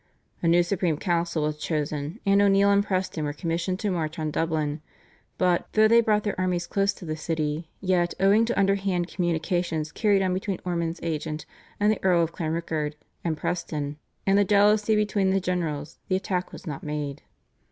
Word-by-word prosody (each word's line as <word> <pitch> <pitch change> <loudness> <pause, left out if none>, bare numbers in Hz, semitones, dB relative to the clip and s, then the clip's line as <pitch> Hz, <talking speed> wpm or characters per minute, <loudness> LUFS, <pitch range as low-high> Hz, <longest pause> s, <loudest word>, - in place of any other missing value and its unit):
A 170 - +1
new 175 +1 +5
Supreme 175 -3 0
Council 170 -2 0
was 150 0 -1
chosen, 150 +3 -3
and 200 0 +4
O'Neill 200 0 +5
and 200 0 +4
Preston 185 -5 -2
were 145 0 -2
commissioned 170 +3 -2
to 210 - 0
march 160 -3 -2
on 155 -1 -2
Dublin, 155 -2 -1 0.6
but, 180 -1 +2
though 215 0 +6
they 230 +1 +6
brought 210 -2 +2
their 205 - -1
armies 180 -1 0
close 200 +2 +1
to 185 - -11
the 155 -1 -3
city, 155 0 -2
yet, 180 -2 +1
owing 200 +4 +5
to 235 -3 -1
underhand 195 -3 +1
communications 170 -2 -1
carried 205 -3 +2
on 185 -1 +1
between 190 0 -2
Ormond's 170 -1 -2
agent, 155 -2 -3 0.3
the 210 +1 +2
Earl 180 -3 +4
of 165 - -2
Clanrickard, 160 -2 -2 0.3
and 160 -2 -1
Preston, 150 -3 -3 0.3
and 195 +1 +4
the - - +5
jealousy 210 +2 +4
between 205 -2 +1
the 195 +1 +2
generals, 165 -5 -3
the 185 - +1
attack 185 -1 -2
was - - -11
not 145 -5 -5
made. 150 -2 -4
175 Hz, 180 wpm, -26 LUFS, 155-195 Hz, 0.6 s, though